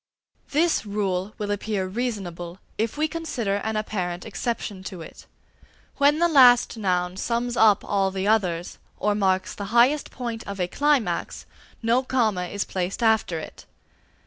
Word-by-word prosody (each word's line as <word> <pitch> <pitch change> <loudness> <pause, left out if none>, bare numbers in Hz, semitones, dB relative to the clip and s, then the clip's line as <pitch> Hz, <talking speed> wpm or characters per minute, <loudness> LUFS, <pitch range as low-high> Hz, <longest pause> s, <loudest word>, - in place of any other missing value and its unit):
This 325 +3 +2
rule 200 -1 -2
will 205 -1 -3
appear 205 -1 -2
reasonable 185 -5 -4 0.2
if 225 +4 -1
we 310 +1 +2
consider 255 -12 -2
an 220 +2 -3
apparent 180 -5 -3
exception 220 -3 -4
to 180 -4 -7
it. - - -13 0.7
When 285 +1 +4
the 345 +1 +4
last 250 -8 +6
noun 180 -4 -1
sums 235 +3 -1
up 220 -4 +4
all 195 -1 +1
the 190 +1 -3
others, 180 -6 0 0.2
or 210 - +1
marks 190 -2 +1
the 200 - -6
highest 240 +8 +3
point 235 -3 -5
of 200 -1 -6
a 180 - 0
climax, 290 +3 0 0.4
no 235 +3 +3
comma 225 -8 0
is 200 +3 -3
placed 185 +5 -3
after 220 -6 +2
it. 160 - -9
210 Hz, 150 wpm, -24 LUFS, 190-240 Hz, 0.7 s, last